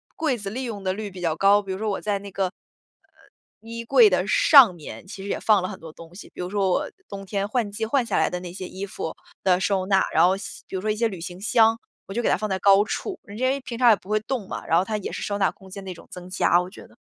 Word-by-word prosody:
柜 290 -7 0
子 200 -2 -5
利 255 +5 -4
用 215 -5 -5
的 185 -1 0
率 210 +1 -5
比 185 -2 -10
较 165 -2 0
高。 200 +3 +4
比 195 - -7
如 190 - -3
说 220 - -1
我 - - -3
在 205 -1 -1
那 200 0 -10
个， 195 - -1
呃， 180 - -3 1.1
衣 230 +1 -7
柜 450 - +6
的 - - +1
上 280 - +7
面 165 +2 -10
其 195 0 -9
实 200 - -6
也 - - -2
放 210 -4 +3
了 185 - -3
很 195 - -8
多 160 -1 -11
东 165 +1 -14
西， 195 - -10
比 - - -7
如 180 - -4
说 195 -2 +1
我 - - 0 0.2
冬 195 0 -7
天 200 +1 -2
换 220 -2 -1
季 220 +2 -3
换 255 +3 +1
下 235 - -1
来 - - +3
的 180 - -3
那 180 -1 -8
些 185 0 -7
衣 195 +1 -6
服 160 - -5 0.3
的 180 -1 +3
收 190 -1 0
纳， 190 -1 +3
然 - - +5
后 185 +2 +3
像 - - -7 0.2
比 - - -7
如 185 - -2
说 215 - -2
一 215 - +1
些 230 +2 +1
旅 190 -6 -7
行 175 +1 -7
箱， 225 +2 +3 0.3
我 195 - -7
就 240 - -1
给 - - +2
它 - - +4
放 215 -1 -3
在 190 - 0
高 200 +1 +5
处， 370 - -4
就 200 - -10
因 255 +3 0
为 275 +1 0
平 235 -2 -7
常 240 -1 +6
也 - - +6
不 195 - -17
会 215 0 +2
动 220 -3 -4
嘛， - - -6
然 165 - +1
后 - - +1
它 215 +1 -2
也 200 - -5
是 - - -5
收 205 0 -2
纳 195 - +2
空 190 -1 -17
间 195 0 -9
的 185 - -5
一 - - -5
种 170 - -15
增 180 0 -9
加 175 - +3
我 180 - -3
觉 - - -13
得。 - - -23
200 Hz, 335 characters per minute, -24 LUFS, 185-220 Hz, 1.1 s, 上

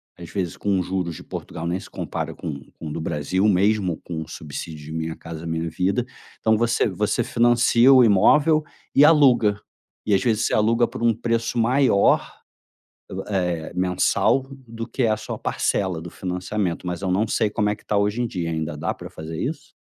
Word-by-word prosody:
às 85 -2 -10
vezes, 90 -4 -3
com 100 -2 0
os 90 - -2
juros 90 -3 -2
de - - -10
Portugal, 80 - -7
nem 85 +2 -1
se - - -12
compara - - -5
com 70 -3 -6 0.2
com 80 - -7
o - - -5
do 80 - -4
Brasil, 80 +5 -1
mesmo 95 -2 +2
com 80 -2 -5
o 80 - -7
subsídio 75 -1 -7
de 80 - -9
Minha 80 0 -3
Casa 85 0 -8
Minha 80 0 -2
Vida, 95 +8 0 0.3
então 110 0 +3
você 115 +1 +1
você 105 +4 0
financia 120 +2 +4
o 130 -2 +8
imóvel 150 +9 +4 0.3
e 140 - +6
aluga 130 -9 +5 0.5
e, 105 - +1
às 95 -1 +3
vezes, 115 -2 +1
você - - 0
aluga 115 +2 +3
por - - -7
um 115 -1 +4
preço 115 +1 -1
maior, 125 -3 +3 1.0
eh, 90 -4 -1
mensal 90 +8 +1 0.2
do 115 0 -6
que 125 +2 -2
a 110 - +3
a - - -5
sua 110 0 -6
parcela 95 -4 -1
do 85 +1 -8
financiamento, 90 0 -3
mas 90 +1 -4
eu 95 - -1
não 100 +5 +2
sei 110 0 0
como 105 0 0
é 105 - 0
que - - -21
tá 105 - -1
hoje 105 +3 +1
em - - 0
dia, 90 -7 -3
ainda 80 -2 -3
dá 75 +3 -2
pra - - -10
fazer 80 +1 -7
isso? 145 +2 -5
100 Hz, 205 wpm, -23 LUFS, 85-115 Hz, 1.0 s, o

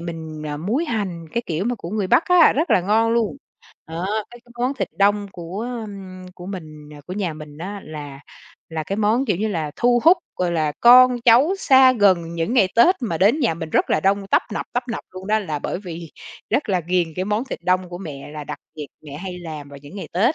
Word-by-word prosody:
mình, 160 -2 -7
à, 145 0 -4
muối 215 - -1
hành, 195 - -3
cái 235 - -1
kiểu 170 +3 -2
mà 245 +1 0
của 170 -6 -8
người 210 -2 -1
Bắc 245 - +4
á, 360 -2 +6
rất 315 +5 -1
là - - +5
ngon 220 +5 +2
luôn, 230 -1 0 0.5
đó, 165 +3 -4 0.2
với 240 - -13
cái 240 - -19
món 255 +3 0
thịt - - -3
đông 205 +1 +3
của, 175 +4 -6 0.3
ừm, 185 -2 -10
của 180 -1 -10
mình 155 -6 -8
ờ, 145 - -12
của 180 - -6
nhà 185 -5 -2
mình 150 -1 -11
á 200 +4 -6
là 145 -3 -8 0.5
là 160 -1 -3
cái 195 - -3
món, 220 +5 +2
kiểu 205 - +1
như 215 +4 -1
là, 160 -7 -2
thu 240 0 +3
hút, 340 +3 +8 0.2
gọi 180 -1 0
là, 155 -3 0
con 250 0 +7
cháu 255 +10 +6
xa 260 -4 +6
gần 185 -7 +2
những 170 +8 -1
ngày 200 -7 +4
Tết 350 +11 +6
mà 170 -9 -2
đến 215 - +4
nhà 235 - +2
mình 160 -1 -6
rất - - +1
là - - +2
đông, 195 +2 +1
tấp - - +3
nập, - - -3
tấp 245 - 0
nập - - -5
luôn 185 +1 -9
đó, 215 +1 +2
là 160 -8 -3
bởi - - -3
vì 170 -4 -8 0.4
rất 285 - 0
là 185 -3 +1
ghiền 175 0 0
cái 185 - -1
món 210 +4 -1
thịt 265 - -6
đông 185 0 +1
của 175 - -7
mẹ 145 -7 -8
là 150 -1 -6
đặc - - -6 0.2
biệt 150 -2 -6 0.2
mẹ 145 -1 -9
hay 180 0 -6
làm 155 -4 -8
vào 140 0 -11
những 145 +7 -11
ngày 195 - -6
Tết. 225 - +2
185 Hz, 245 wpm, -21 LUFS, 165-225 Hz, 0.5 s, hút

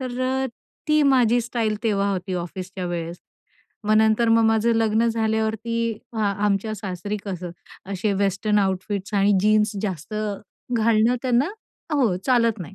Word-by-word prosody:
तर 255 -1 -4
अ, 265 +1 0 0.4
ती 305 0 +4
माझी 245 -4 +4
स्टाईल 225 -2 -1
तेव्हा 200 -3 +1
होती 185 -1 -3
ऑफिसच्या 180 +1 -5
वेळेस. 170 0 -4 0.7
मग 215 +1 +3
नंतर 220 +1 +3
मग 225 0 +4
माझं 225 +1 +3
लग्न 225 +1 +2
झाल्यावरती 220 0 -1 0.4
हा 210 -2 +1 0.2
आमच्या 205 +2 0
सासरी 200 +1 -4
कसं 180 -3 -5 0.4
असे 200 +2 0
वेस्टर्न 200 +2 +1
आउटफिट्स 195 +1 -2
आणि 200 +1 +4
जीन्स 215 +1 +3
जास्त 185 -1 -4 0.6
घालणं 225 +1 +3
त्यांना 255 +4 +2 0.5
हो 245 -10 +2
चालत 230 -4 +3
नाही, 185 +3 -8
215 Hz, 140 wpm, -23 LUFS, 195-230 Hz, 0.7 s, ती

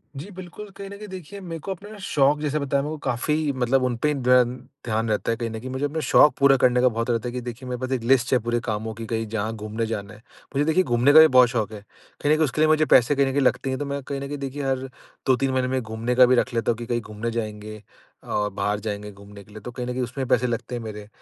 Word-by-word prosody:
जी 145 +9 -7
बिल्कुल, 185 +3 -9
कहीं 195 0 -8
न 200 - -9
कहीं 210 +1 -9
देखिए 190 0 -9
मेरे 165 -3 -6
को 195 - -6
अपना 200 +2 -8
न 215 - -10
शौक 145 -5 +2
जैसा 150 0 -1
बताया 140 -1 0
मेरे 150 - -4
को - - -5
काफ़ी 150 +5 0
मतलब 130 +1 +1
उनपे 125 +2 0
ही 150 - +2
दन 125 -2 +3 0.3
ध्यान 110 -1 -1
रहता 105 +2 0
है 115 - -1
कहीं 115 0 -3
न 110 0 -6
कहीं। 130 +3 -7
मुझे 130 +2 -2
अपना 150 +3 -2
शौक 150 - +6
पूरा 140 -1 +6
करने 125 0 +3
का 125 - +5
बहुत 115 +1 -3
रहता 115 0 0
है 120 - -3
कि 125 - -3
देखिए 125 +1 -7
मेरे 125 -1 -3
पास 130 - -3
एक 130 -3 -1
लिस्ट 125 +1 +3
है 130 - +5
पूरे 120 +1 -1
कामों 110 0 -3
की 115 +1 -7
कहीं 115 0 -2
जहाँ 110 0 -2
घूमने 110 +1 -3
जाना 110 -2 -5
है। 105 - -14 0.4
मुझे 145 +2 +2
देखिए 160 +4 +3
घूमने 125 +1 +3
का 155 - +10
भी 160 - +9
बहुत 130 -3 +6
शौक 110 -3 -1
है। 105 -1 -9 0.4
फिर 145 - +2
एक 155 - +3
उसके 155 0 +1
लिए 155 - +5
मुझे 155 0 +4
पैसे 130 0 +5
कहीं 140 0 +3
न 135 - 0
कहीं 140 - +1
लगते 130 0 +1
हैं 130 - -2
तो 145 - -2
मैं 140 0 -3
कहीं 140 +1 -5
न 140 - -4
कहीं 145 +1 -5
देखिए 140 +1 -5
हर 135 -1 0 0.5
2-3 130 +1 +2
महीने 130 -1 0
में 130 0 -1
घूमने 115 +2 -3
का 125 0 +8
भी 130 +1 +4
रख 125 +1 0
लेता 115 0 +1
हूँ 115 - -3
कि 120 - -6
कहीं 120 0 -1
घूमने 110 +2 -5
जाएँगे 110 -2 -5 0.5
अ, 105 -1 -1
बाहर 105 +1 -2
जाएँगे 105 -1 -5
घूमने 100 0 -13
के 100 - -21
लिए। 110 - -9
तो 125 - -7
कहीं 125 0 -5
न - - -2
कहीं 125 +1 -2
उसमें 130 +3 -4
भी - - -11
पैसे 125 +1 -1
लगते 120 +1 -3
हैं 120 - -4
मेरे। 105 -1 -7
125 Hz, 295 wpm, -24 LUFS, 115-140 Hz, 0.5 s, का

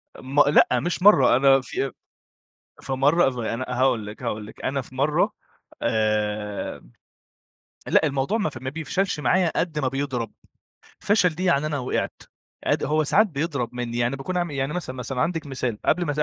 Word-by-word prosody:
م 135 +3 -2
لأ، - - +6
مش 175 +1 -2
مرّة، 210 -10 +7
أنا 135 0 +5
في 135 0 -3 0.9
في 135 - -4
مرّة 145 +6 +3
اف 125 -2 -2
أنا 115 +2 -3
هاقول 125 -4 +1
لِك، 105 +4 -9
هاقول 105 -3 -3
لِك. - - -13
أنا 135 0 0
في 130 - -15
مرّة 145 +3 +2 0.5
آآ 105 -1 -1 1.1
لأ، 160 - +3
الموضوع 140 +10 0
ما 205 - 0
ف 130 - -9
ما 130 - -3
بيفشلش 165 +3 -2
معايا 180 +1 +2
قد 160 -3 -1
ما 135 -3 +1
بيضرب. 135 -3 -3 0.7
فشل 205 -3 +3
دي 175 +3 -5
يعني 155 -4 +2
أنا 150 -2 -2
وقعت، 125 - -3 0.4
قد - - +1
هو 155 +1 +1
ساعات 215 +9 +4
بيضرب 140 - -2
منّي، 120 -1 -3
يعني 120 +3 0
باكون 180 +7 -4
عامل 175 -2 0
إيه؟ 140 - -5
يعني 135 +2 -1
مثلًا، 150 -7 -5
مثلًا 125 +1 -4
عندِك 165 -3 -1
مثال، 125 -5 -3
قبل 180 0 +2
ما 145 - -1
سا 150 - 0
135 Hz, 185 wpm, -24 LUFS, 125-160 Hz, 1.1 s, مرّة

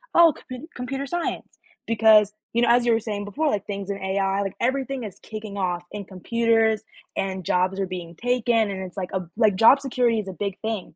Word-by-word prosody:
"Oh, 335 -2 +7
compu 255 +5 -8
computer 270 +3 -4
science," 345 +4 -4 0.3
because, 215 -2 +5 0.2
you 235 - +2
know, 240 - +3
as 240 0 +4
you 235 - +4
were 225 - +3
saying 210 -2 -4
before, 295 +10 0
like, 205 -6 -1
things 200 -1 -5
in 200 - -3
AI, 195 +1 0
like, 195 - -4
everything 265 +1 -1
is 200 - -8
kicking 215 -2 -7
off 175 -2 -1
in 205 -1 -6
computers, 225 +3 +1 0.3
and 190 -1 -2
jobs 185 +3 +1
are 195 - 0
being 175 -2 -7
taken, 235 0 +1
and 190 -1 -4
it's 185 -1 -9
like 185 -2 -3
a 190 - 0
b 175 - -11
like 215 -4 +4
job 230 +7 +7
security 245 -4 +1
is 205 - -5
a 190 - -5
big 200 +1 -4
thing. 220 -7 -4
215 Hz, 220 wpm, -24 LUFS, 195-240 Hz, 0.3 s, Oh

